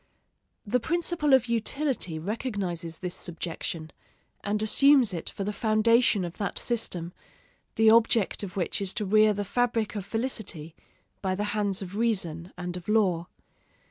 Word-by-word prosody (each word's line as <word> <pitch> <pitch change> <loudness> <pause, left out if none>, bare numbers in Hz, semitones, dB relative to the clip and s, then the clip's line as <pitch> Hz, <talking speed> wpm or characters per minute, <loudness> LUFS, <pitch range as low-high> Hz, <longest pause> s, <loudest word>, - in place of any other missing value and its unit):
The 245 +4 +1
principle 335 +1 0
of 260 -3 +6
utility 235 - -1
recognizes 180 -4 -4
this 180 -1 -5
subjection, 165 -2 -6 0.5
and 210 +1 0
assumes 265 -1 +5
it 165 - -4
for 200 - -5
the 210 +2 -3
foundation 215 -1 +3
of 170 - -8
that 200 - -2
system, 180 -8 -1 0.6
the 225 0 +5
object 225 -2 +3
of 200 -2 -7
which 180 +2 -1
is 195 -1 -2
to 210 - -2
rear 215 +2 +5
the 205 0 -2
fabric 230 0 0
of 205 -3 -4
felicity 215 -8 -3 0.5
by 190 -1 -1
the 205 - -2
hands 205 -2 -1
of 190 +1 -8
reason 185 -7 -1
and 180 0 -5
of 180 -1 -8
law. 185 -6 +2
205 Hz, 150 wpm, -27 LUFS, 180-230 Hz, 0.6 s, of